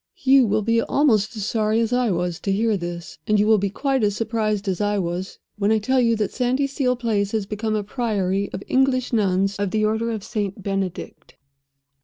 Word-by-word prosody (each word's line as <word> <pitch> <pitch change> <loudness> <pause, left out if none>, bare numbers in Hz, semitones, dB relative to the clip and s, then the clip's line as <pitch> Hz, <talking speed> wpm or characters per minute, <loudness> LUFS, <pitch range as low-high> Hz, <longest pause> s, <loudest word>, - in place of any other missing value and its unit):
"You 265 -2 +5
will 215 +1 +1
be 230 +2 +2
almost 230 -6 +2
as 205 - -3
sorry 215 +1 +1
as 230 +1 0
I 245 -2 +2
was 175 -1 -1
to 195 - -2
hear 215 +2 +1
this; 175 -2 -6
and 210 -1 +3
you 205 - +3
will 220 -1 +4
be 200 +1 0
quite 270 +4 -1
as 205 -1 +1
surprised 215 -2 -1
as 190 +1 -1
I 205 0 +1
was, 180 +1 -3 0.2
when 205 +1 +2
I 220 - +4
tell 255 +5 +1
you 230 -1 +3
that 210 -2 -1
Sandyseal 260 +1 0
Place 215 -4 -1
has 215 -3 0
become 215 +2 -2
a 210 - -1
Priory 200 -4 -1
of 190 - -6
English 260 -1 +1
Nuns, 195 -2 +1
of 200 -1 -1
the 215 +2 +1
order 220 +2 0
of 220 -3 -4
St. 205 -3 -4
Benedict. 190 -5 -4
215 Hz, 210 wpm, -22 LUFS, 195-230 Hz, 0.2 s, You